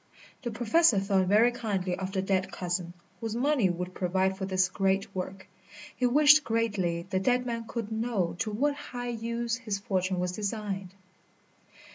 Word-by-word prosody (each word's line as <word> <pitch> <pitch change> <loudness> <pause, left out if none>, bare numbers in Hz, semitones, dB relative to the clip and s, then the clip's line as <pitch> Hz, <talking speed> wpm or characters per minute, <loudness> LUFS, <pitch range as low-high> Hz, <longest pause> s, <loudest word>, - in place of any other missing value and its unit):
The 245 - -3
Professor 240 +3 +3
thought 195 -1 +1
very 215 +5 +5
kindly 195 -6 -2
of 190 +1 -4
the 190 -1 -1
dead 190 -1 0
cousin, 175 0 -3 0.3
whose 225 +1 -3
money 255 -5 +2
would 180 +1 -4
provide 190 +1 0
for 190 - -4
this 185 -1 +2
great 195 +1 0
work. 190 +1 -5 0.5
He 250 - +2
wished 300 +3 +6
greatly 205 -7 -1
the 190 - +2
dead 250 +5 +1
man 230 -1 -3
could 230 -3 -4
know 220 -6 -1
to 215 - -1
what 275 +8 +1
high 245 -4 -6
use 235 +1 -2
his 220 -5 -3
fortune 185 -2 -1
was 180 0 -1
designed. 195 -1 -4
200 Hz, 165 wpm, -29 LUFS, 185-235 Hz, 0.5 s, wished